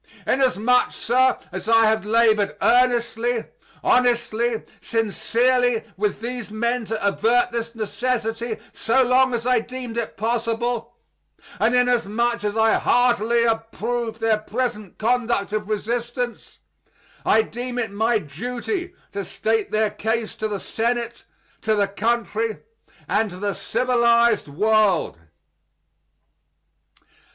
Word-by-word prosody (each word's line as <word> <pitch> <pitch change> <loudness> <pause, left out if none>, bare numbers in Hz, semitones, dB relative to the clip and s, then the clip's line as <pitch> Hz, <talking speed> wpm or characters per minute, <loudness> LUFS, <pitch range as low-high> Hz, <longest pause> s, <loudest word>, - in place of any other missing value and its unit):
Inasmuch, 250 -2 +2
sir, 255 +2 +2
as 190 +3 -5
I 225 0 +6
have 220 -1 +1
labored 215 -2 +3
earnestly, 240 -1 +2 0.4
honestly, 240 -2 +1 0.2
sincerely, 235 +2 +1
with 210 +2 -2
these 240 -1 -5
men 235 +2 -1
to 215 -1 -2
avert 240 +4 +2
this 230 0 -4
necessity 225 0 -2 0.2
so 260 +4 +2
long 255 0 +3
as 230 0 -4
I 250 -1 +3
deemed 245 0 -7
it 235 - -3
possible, 230 +1 -2 0.6
and 235 +3 +3
inasmuch 235 -2 +1
as 210 +1 -2
I 220 0 +4
heartily 235 -1 +3
approve 225 0 -2
their 225 -1 +1
present 215 -2 -4
conduct 230 -3 0
of 215 -1 -2
resistance, 240 +3 -3 0.7
I 220 - +4
deem 245 +2 -6
it 230 -4 -2
my 220 +3 +1
duty 250 - -5 0.2
to 200 0 -4
state 220 +4 -1
their 215 -1 +1
case 220 +1 -2
to 215 - -1
the 205 -2 -4
Senate, 235 +2 -2 0.4
to 220 0 +1
the 200 -1 +2
country, 225 +1 -1 0.5
and 215 +1 +1
to 180 - -9
the 200 +1 -2
civilized 235 +2 +2
world. 200 - +2
230 Hz, 120 wpm, -22 LUFS, 215-245 Hz, 0.7 s, I